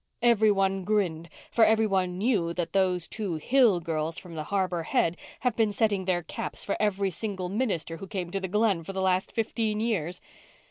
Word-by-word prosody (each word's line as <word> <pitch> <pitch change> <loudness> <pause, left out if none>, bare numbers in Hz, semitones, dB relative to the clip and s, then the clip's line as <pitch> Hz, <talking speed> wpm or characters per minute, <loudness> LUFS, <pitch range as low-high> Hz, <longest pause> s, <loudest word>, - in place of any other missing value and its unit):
Every 225 -3 +5
one 195 -1 +1
grinned, 175 -5 0 0.2
for 230 - +4
every 220 0 +4
one 185 -3 0
knew 195 -6 +1
that 170 -1 -3
those 185 -3 +1
two 205 -6 -3
Hill 225 - +3
girls 160 0 -2
from 175 -2 -9
the 155 -1 -5
Harbour 185 -2 0
Head 165 +1 +1 0.3
have 250 -3 +1
been 220 -2 +2
setting 205 -2 +1
their 175 -2 0
caps - - -4
for 200 - -1
every 200 -2 +1
single 190 -1 -4
minister 190 -7 -1
who 195 - -8
came 180 -4 -4
to 195 - -1
the 190 - -3
Glen 205 -3 +1
for 195 - -7
the 190 - -3
last 185 0 +1
fifteen 220 -1 -1
years. 180 -7 -1
190 Hz, 195 wpm, -27 LUFS, 175-215 Hz, 0.3 s, Every